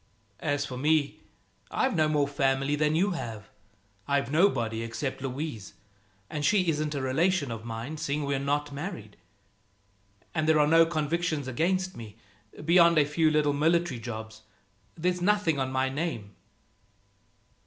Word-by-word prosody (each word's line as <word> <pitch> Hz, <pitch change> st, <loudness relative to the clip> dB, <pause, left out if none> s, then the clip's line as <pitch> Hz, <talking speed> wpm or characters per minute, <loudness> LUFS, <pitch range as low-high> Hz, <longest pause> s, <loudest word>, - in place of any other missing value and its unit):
"As 145 Hz, -2 st, -1 dB
for 125 Hz, -, -6 dB
me, 150 Hz, +1 st, +1 dB, 0.5 s
I've 260 Hz, -4 st, 0 dB
no 155 Hz, -2 st, +3 dB
more 150 Hz, -2 st, +1 dB
family 135 Hz, 0 st, +1 dB
than 150 Hz, +1 st, +1 dB
you 195 Hz, +5 st, +2 dB
have. 115 Hz, -, -6 dB, 0.6 s
I've 140 Hz, -2 st, 0 dB
nobody, 120 Hz, -, +2 dB
except 115 Hz, +4 st, -4 dB
Louise 135 Hz, -5 st, -5 dB, 0.5 s
and 150 Hz, +5 st, -4 dB
she 190 Hz, +2 st, +3 dB
isn't 150 Hz, -1 st, -1 dB
a 140 Hz, -, -2 dB
relation 150 Hz, +2 st, +1 dB
of 115 Hz, 0 st, -6 dB
mine, 115 Hz, +7 st, -5 dB
seeing 150 Hz, -1 st, -2 dB
we're 140 Hz, -1 st, 0 dB
not 145 Hz, +1 st, -1 dB
married. 140 Hz, -, -7 dB, 1.2 s
And 155 Hz, -1 st, 0 dB
there 155 Hz, -1 st, +5 dB
are 150 Hz, -, +5 dB
no 165 Hz, +2 st, +5 dB
convictions 155 Hz, -2 st, -1 dB
against 185 Hz, +8 st, 0 dB
me, 110 Hz, -3 st, -10 dB, 0.5 s
beyond 170 Hz, 0 st, +5 dB
a 150 Hz, -, +5 dB
few 155 Hz, +2 st, +2 dB
little 150 Hz, -1 st, +2 dB
military 160 Hz, -2 st, +1 dB
jobs. 110 Hz, -1 st, -7 dB, 0.6 s
There's 180 Hz, +2 st, 0 dB
nothing 180 Hz, -6 st, +2 dB
on 130 Hz, 0 st, -1 dB
my 130 Hz, 0 st, +1 dB
name." 130 Hz, -8 st, -4 dB
145 Hz, 145 wpm, -28 LUFS, 130-165 Hz, 1.2 s, there